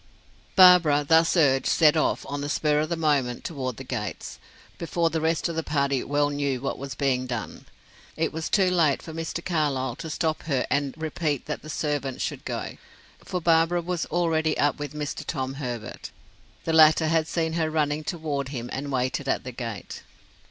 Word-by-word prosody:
Barbara, 175 -6 +7
thus 165 +3 +4
urged, 135 -5 +3
set 155 -2 +5
off, 155 - 0
on 145 0 -4
the 145 - -3
spur 150 0 +1
of 155 +1 -1
the 170 - 0
moment, 145 -7 0
toward 130 -7 -4
the - - -7
gates, - - -5 0.4
before 170 0 0
the 160 0 -1
rest 160 +1 +1
of 170 - -4
the 160 - 0
party 140 -4 0
well 145 0 +1
knew 140 -2 -1
what 135 +2 -4
was 140 0 -6
being 130 -2 0
done. 120 -3 -5 0.5
It 160 0 0
was 160 0 -3
too 190 -3 +3
late 160 -6 +2
for 160 - -8
Mr. 165 +1 -4
Carlyle 140 -7 0
to 160 - -6
stop 155 0 -1
her 135 -5 0
and 140 -1 0
repeat 155 -3 -2
that 150 - -4
the 155 - -11
servant 145 -4 -2
should - - -4
go, - - -4 0.5
for 180 - -3
Barbara 165 +1 +3
was 175 0 -2
already 160 -2 +1
up 145 0 +1
with 145 +1 -5
Mr. 150 -1 -4
Tom 130 -3 -3
Herbert. 120 -4 -5 0.6
The 165 - 0
latter 160 0 +6
had 160 0 +2
seen 160 -1 -1
her 160 -1 0
running 155 -1 0
toward 150 -5 -3
him, 120 -3 -6
and 140 +1 -4
waited 130 +2 -1
at - - 0
the 125 - -6
gate. 115 -6 -6
150 Hz, 190 wpm, -25 LUFS, 140-160 Hz, 0.6 s, Barbara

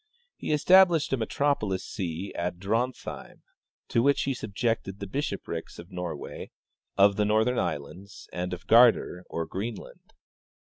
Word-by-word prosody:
He - - -4
established 170 0 +5
a - - +2
metropol 140 -1 0
itan - - -3
see 90 0 -5
at 90 0 -3
Drontheim, 115 +7 -3 0.5
to 115 - +2
which 140 +3 +3
he 135 - 0
subjected 110 -3 -2
the 100 - -4
bishoprics 100 - -4
of 85 +3 -11
Norway, 90 -5 -6 0.5
of 100 0 +5
the 105 - +3
Northern 110 +4 +2
islands, 90 +8 -5
and 90 +1 -3
of 90 0 -6
Gardar, 115 -6 +5
or 85 - -3
Greenland. 105 +6 -7
100 Hz, 140 wpm, -27 LUFS, 90-125 Hz, 0.5 s, established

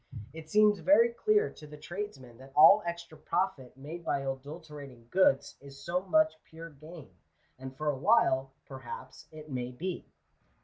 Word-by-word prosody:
It 160 -1 -11
seems 210 +1 +4
very 200 +8 +5
clear 425 - +1
to 150 - -13
the 150 0 -11
tradesman 145 - -8
that 135 +1 -15
all 165 +8 +8
extra 170 -2 -6
profit 155 -9 -3
made 155 +5 -8
by 140 - -1
adulterating 140 -2 -8
goods, 185 -8 +2
is 140 -1 -13
so 180 +5 -2
much 315 +11 +1
pure 165 +1 -11
gain; 155 +2 -13 0.5
and 130 0 -9
for 150 - -4
a 145 - +1
while,, 135 - +3
perhaps, 130 -1 -10
it 155 -1 -12
may 125 -1 -3
be. 175 +8 -5
155 Hz, 160 wpm, -30 LUFS, 135-185 Hz, 0.5 s, all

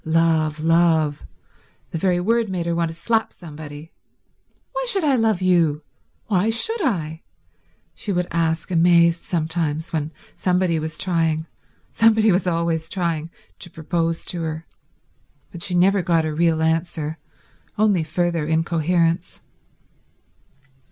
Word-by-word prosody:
Love, 160 -1 +1
love... 160 -2 +2 0.6
the - - -3
very 180 0 +1
word 225 +4 +1
made 180 -3 -3
her 170 - 0
want 170 -1 0
to - - -6
slap 225 +5 0
somebody. 155 -1 -10 0.8
"Why - - -3
should 390 -6 +2
I 290 -3 +3
love 220 -6 +1
you? 165 -5 +2 0.4
Why 205 0 +1
should 425 - +2
I?" 160 - -2 0.7
she 205 - -4
would 180 -1 0
ask 165 0 -1
amazed 170 0 +4
sometimes 160 -1 -2
when 155 -1 -2 0.2
somebody 180 -3 +1
was 155 0 -5
trying—somebody 180 +6 0
was 185 +1 +1
always 165 -1 -1
trying—to 170 0 -5
propose 165 +1 -2
to 175 - -2
her. 160 0 -4 0.9
But 175 - -9
she 180 -1 +1
never 190 +2 +4
got 170 -3 +1
a 155 - -2
real 160 0 +1
answer, 160 -1 -1 0.6
only 205 -5 +3
further 165 0 -1
incoherence. 165 +1 0
170 Hz, 125 wpm, -22 LUFS, 160-180 Hz, 0.9 s, amazed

